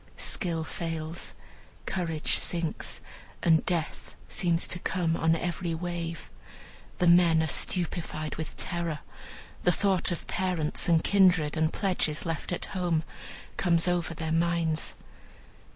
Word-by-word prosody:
Skill 170 -4 -2
fails, 165 0 -4 0.5
courage 165 -4 0
sinks, 170 -2 -1 0.4
and 160 -2 +5
death 170 -3 -2
seems 170 -2 +1
to 175 - +1
come 170 -2 0
on 165 0 +3
every 170 0 -2
wave. 170 -1 -4 0.7
The 180 - +2
men 170 -2 +6
are - - +1
stupefied 160 -2 -1
with 160 -1 -6
terror. 170 -4 -3 0.6
The 180 - +4
thought 190 0 +2
of 175 - -4
parents, 180 -4 -1
and 165 -1 +4
kindred, 180 -7 +4
and 160 0 +2
pledges 180 -6 0
left 165 0 -3
at 175 - -2
home, 175 -4 +1 0.5
comes 170 -2 +3
over 175 -2 0
their 160 0 -3
minds. 165 -1 +1
170 Hz, 125 wpm, -28 LUFS, 160-175 Hz, 0.7 s, men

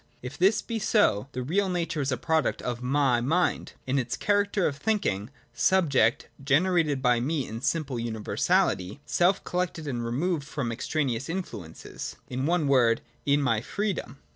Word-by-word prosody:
If 125 +3 -6
this 190 +7 +3
be 230 -2 -3
so, 165 - +2
the 125 - -3
real 190 +8 +1
nature 170 -4 -1
is 135 0 -1
a 130 - 0
product 160 +5 0
of 120 -1 -3
my 130 -1 +2
mind, 165 +7 0
in 135 +1 +1
its 120 -2 -3
character 205 -1 +1
of 140 - 0
thinking 140 - -1 0.2
subject— 135 -3 +2 0.2
generated 150 -1 +2
by 125 -2 +4
me 140 +2 -1
in 110 - -6
my - - -8
simple 140 -5 -1
universality, 110 -2 0
self 180 +3 +2
collected 175 -3 -2
and 120 -4 -2
removed 145 +7 -1
from 140 -4 -3
extraneous 135 +1 -2
influences 135 - -6
— - - -34
in 130 +3 -1
one 170 -3 +1
word, 120 -4 +4 0.3
in 145 0 +3
my 115 -5 +1
Freedom. 200 - -3
140 Hz, 165 wpm, -27 LUFS, 120-175 Hz, 0.3 s, by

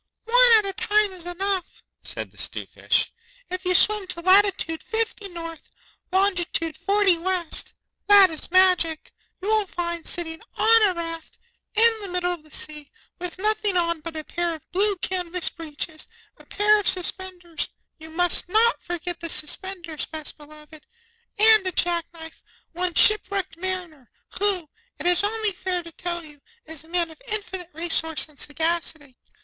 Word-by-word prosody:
'One - - +6
at 425 - +2
a 390 - -2
time 425 -1 +2
is 350 -2 -9
enough,' 375 +1 -3 0.2
said - - -5
the - - -24
'Stute - - -1
Fish. - - 0 0.4
'If 365 0 -5
you 365 0 +2
swim 420 -1 +4
to 340 - -5
latitude 375 -3 +3
Fifty 445 -3 -3
North, 330 -2 -9 0.4
longitude 360 -4 0
Forty 395 -3 +2
West 355 -1 -2 0.3
(that 400 -3 +7
is 315 - -6
magic), 360 -3 +2 0.3
you - - -4
will 430 -2 +2
find, 340 -2 -5
sitting 325 -1 -3 0.2
on 450 -1 +5
a 365 - -4
raft, 330 -1 -7 0.4
in 450 +1 +5
the 400 - -5
middle 360 -1 -1
of 345 - -9
the 310 - -22
sea, 300 -1 -1 0.3
with 360 0 -5
nothing 425 -1 0
on 340 -1 0
but 325 0 -7
a 310 - -5
pair 340 +1 -3
of 310 - -17
blue 405 +2 +1
canvas 360 -1 -2
breeches, 315 -1 -5 0.3
a - - -20
pair 420 +1 +3
of 410 - -3
suspenders 360 -2 -1 0.3
(you 315 0 -11
must 350 +2 +4
not 455 +5 +2
forget 350 0 -5
the 335 - -6
suspenders, 330 +1 -2
Best 315 -2 -5
Beloved), 300 0 -15 0.5
and 430 -2 +6
a - - 0
jack 345 -1 +1
knife, 325 -1 -12 0.3
one 355 0 -2
ship 425 -2 +7
wrecked 390 -4 -3
Mariner, 345 -7 -5 0.3
who, 385 -5 0 0.3
it - - -7
is 355 +2 +4
only 435 0 0
fair 360 -1 -3
to 335 - -11
tell 345 0 -5
you, 295 -2 -16 0.2
is 315 -1 -7
a - - -19
man 340 -1 -1
of 320 - -16
infinite 385 -5 -3
resource 320 -2 +2
and 300 -2 -21
sagacity. 320 -3 -3
355 Hz, 165 wpm, -23 LUFS, 330-395 Hz, 0.5 s, that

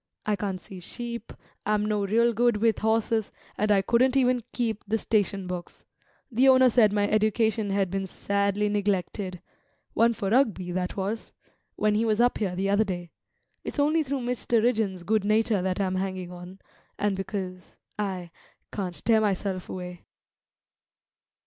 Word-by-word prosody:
I 210 - +1
can't 195 -2 -3
see 185 0 -10
sheep, 235 +4 -6 0.3
I'm 210 0 +1
no 210 -1 0
real 230 +3 +3
good 240 0 +2
with 225 +1 +2
horses, 220 -1 +1 0.2
and 210 - 0
I 195 -1 +4
couldn't 255 +5 +3
even 250 -2 +3
keep 225 -4 -2
the 220 +2 +1
station 205 -3 0
books; 180 -1 -7 0.5
the 255 +4 +4
owner 260 -1 +6
said 220 -3 +5
my 205 0 +1
education 215 0 +1
had 195 -2 0
been 195 0 -2
sadly 200 +2 0
neglected 200 -2 -2 0.5
(one 235 +1 +4
for 200 -1 -2
Rugby, 215 -8 +2
that 180 +1 -3
was!) 200 +4 -3 0.4
when 215 0 +2
he 215 +2 +2
was 215 -1 +1
up 245 +1 +3
here 190 -4 -1
the 190 +2 -1
other 200 +2 +3
day. 175 -4 -5 0.5
It's - - -6
only 300 +3 +3
through 280 -2 -2
Mr. 240 -1 0
Rigden's 215 -7 0
good 215 +2 +1
nature 215 -1 +2
that 185 +1 -1
I'm 185 -1 0
hanging 185 -1 -3
on, 180 +1 -10 0.4
and 205 -1 0
because 190 -1 -5 0.2
I 185 -4 -3 0.4
can't 185 -4 -5
tear 225 -2 +4
myself 195 -2 -1
away." 180 -1 -7
205 Hz, 160 wpm, -27 LUFS, 190-225 Hz, 0.5 s, owner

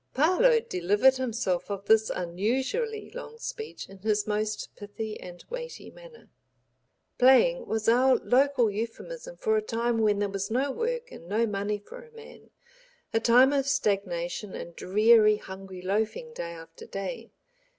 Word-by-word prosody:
Parload 445 - +4
delivered 205 +9 +3
himself 225 -8 -2
of 200 0 -5
this 220 0 +4
unusually 260 - -2
long 465 -2 -9
speech 445 -1 -7
in 195 0 -14
his 210 +1 0
most 215 0 -3
pithy 215 +1 -6
and 175 -1 -11
weighty 485 0 -7
manner. - - -16 0.9
"Playing" 485 - +5
was 220 -1 -2
our 255 +3 +5
local 255 -3 +2
euphemism 485 - -6
for 440 -3 +1
a - - +1
time 235 - -1
when 210 -2 +3
there 205 0 0
was 195 0 -4
no 265 +5 0
work 480 - -3
and 165 - -11
no 220 +3 +2
money 205 0 -2
for 350 - -12
a 475 - -17
man, 455 0 -14 0.6
a 225 - +3
time 250 +4 +5
of 275 -1 +1
stagnation 195 -7 -1
and 170 - -8
dreary 215 +2 +4
hungry 190 -2 -10
loafing 220 - -2
day 170 - -5
after 165 0 -12
day. 225 +4 -6
225 Hz, 150 wpm, -27 LUFS, 200-285 Hz, 0.9 s, Playing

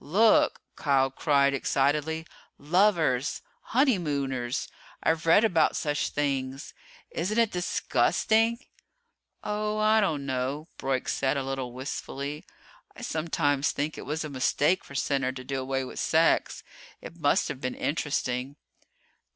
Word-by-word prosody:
"Look!" 210 +9 +3
Kial 135 -2 +2
cried 140 -2 +3
excitedly. 150 +4 0 0.3
"Lovers! 160 -5 +2 0.2
Honeymooners! 145 - 0 0.4
I've 165 0 +1
read 185 +6 +6
about 170 -8 +3
such 145 -1 -1
things! 135 -1 -2 0.4
Isn't 185 +7 -2
it 230 -2 +3
disgusting?" 220 +5 +1 0.9
"Oh, 210 0 -2
I 215 +1 +4
don't 155 -8 0
know," 135 +4 -3
Broyk 135 -1 -1
said, 135 +1 0
a 135 - -1
little 135 -2 -4
wistfully. 140 +3 -5 0.5
"I - - -10
sometimes 150 -3 0
think 150 +2 -2
it - - -9
was 155 +2 -2
a 155 - -5
mistake 145 +6 +1
for 140 - -12
Center 135 -1 0
to 130 -1 -8
do 135 +1 -3
away 135 0 -2
with 130 - -7
sex. - - +2 0.4
It - - -11
must - - +2
have 130 - -6
been 125 - -3
interesting." 140 -3 -2
145 Hz, 130 wpm, -27 LUFS, 135-165 Hz, 0.9 s, read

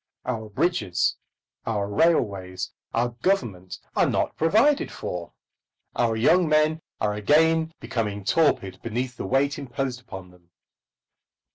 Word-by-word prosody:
Our 110 -4 -3
bridges, 105 - +1 0.5
our 105 -3 -1
railways, 100 - +1 0.2
our 120 +1 +1
Government 120 - -2 0.2
are - - +3
not - - 0
provided 225 - +3
for. 90 -1 -6 0.6
Our 115 -2 +1
young 165 +9 +4
men 155 +1 +3 0.2
are 105 -1 0
again 160 +9 +3
becoming 105 -3 -3
torpid 100 - +1
beneath 125 +2 -3
the - - -5
weight 140 +2 +1
imposed 130 -1 -4
upon 95 -7 -10
them. 90 -1 -23
120 Hz, 120 wpm, -25 LUFS, 100-155 Hz, 0.6 s, young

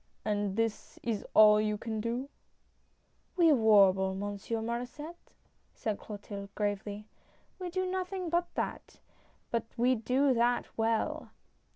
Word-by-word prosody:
" - - -42
And 205 -2 0
this 225 -1 -2
is 225 -3 -2
all 210 0 +8
you 210 0 0
can 220 0 -4
do? 235 +4 -2 0.5
" - - -41
"We 335 -3 +6
warble. 195 -5 +5
Monsieur 205 +3 -3
Mauresset, 245 +8 -5 0.6
said 215 -2 -3
Clotilde, 200 -1 -8
gravely. 205 0 -3 0.5
"We 365 -1 -4
do 370 +2 -1
nothing 370 -1 -3
but 345 0 0
that, - - -4 0.5
but 230 -1 0
we 245 +2 +4
do 255 +4 +2
that 240 +1 +2
well!" 225 0 0
225 Hz, 135 wpm, -31 LUFS, 205-260 Hz, 0.6 s, all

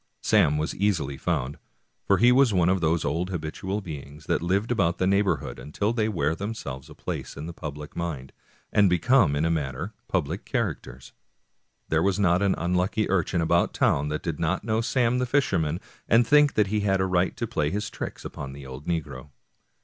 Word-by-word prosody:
Sam 75 +1 +4
was 75 +1 -1
easily 85 -9 0
found, 65 +1 -2 0.5
for 100 - +4
he 120 +4 +5
was 125 -4 +4
one 90 -1 +3
of 95 -1 +1
those 80 0 +1
old 85 +4 -1
habitual 95 +4 -4
beings 75 -3 -9
that - - 0
live 100 +7 0
about 90 -7 +1
a 95 - +2
neighborhood 95 -6 +1
until 100 +9 -2
they 110 -2 0
wear 80 -6 0
themselves 80 -9 -6
a - - -12
place - - -5
in 75 - -5
the 85 - -6
public 75 -2 -8
mind, 75 -7 -4 0.4
and 100 -2 +5
become, 90 - +3
in 75 +3 +1
a 85 - +1
manner, 75 +4 -3
public 85 +1 -1
characters. 80 - -4 0.8
There 80 0 +2
was 100 +2 +1
not 90 -2 +3
an 100 -1 +2
unlucky 90 +5 0
urchin 90 -2 +1
about 85 +1 +2
town 70 +1 +2
that 75 +1 -3
did 80 -3 -3
not 85 +4 0
know 110 0 0
Sam 120 +1 +1
the 125 - 0
fisherman, 90 - +1 0.3
and 115 +1 +5
think 145 +3 +5
that 105 - +4
he 105 - +2
had 95 -2 +1
a 95 - +2
right 90 -1 +1
to - - -1
play 75 - -1
his 105 +5 -3
tricks - - -6
upon 70 -1 -6
the 70 0 -10
old 65 +2 -9
negro. 75 -5 -3
90 Hz, 195 wpm, -26 LUFS, 75-100 Hz, 0.8 s, he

